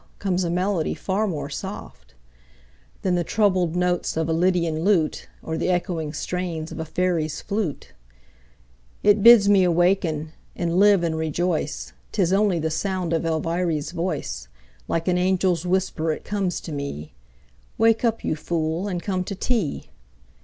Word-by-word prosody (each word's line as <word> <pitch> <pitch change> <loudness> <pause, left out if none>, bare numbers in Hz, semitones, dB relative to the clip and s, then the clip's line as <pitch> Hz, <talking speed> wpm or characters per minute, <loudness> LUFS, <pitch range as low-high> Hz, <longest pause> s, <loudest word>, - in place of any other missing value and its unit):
comes 185 -2 0
a 170 - -1
melody 180 -1 0
far 205 +3 -1
more 160 -7 -3
soft - - -8 0.9
Than 185 - +1
the 175 -1 +1
troubled 185 -4 +1
notes 180 -2 0
of 160 -1 0
a 165 - 0
lydian 170 -2 +1
lute 175 -6 +1 0.2
Or 160 0 -3
the - - 0
echoing 175 -4 -1
strains 170 -1 -4
of - - -7
a 160 - -3
fairy's 160 -2 -1
flute; 200 -7 -3 1.1
It 205 0 +5
bids 230 -2 +8
me 200 -2 +5
awaken 175 -3 +1 0.2
and 170 +1 0
live 200 -3 +5
and 165 -1 0
rejoice, 160 0 -2 0.2
'Tis 190 -4 +2
only 200 -2 +3
the 160 -1 -1
sound 185 -1 -1
of 165 0 0
Elviry's 165 -1 -1
voice 150 - -3 0.4
Like 165 +1 -1
an 180 -1 +2
angel's 180 -2 +1
whisper 180 -3 0
it 155 - -5
comes 195 -3 -2
to 165 - -8
me: 140 - -5 0.6
"Wake 225 +1 +3
up, 230 -1 0
you - - 0
fool, 160 +3 -2
and 180 -3 -3
come 185 -2 -1
to 195 - -4
tea." 215 - -2
175 Hz, 155 wpm, -23 LUFS, 160-190 Hz, 1.1 s, bids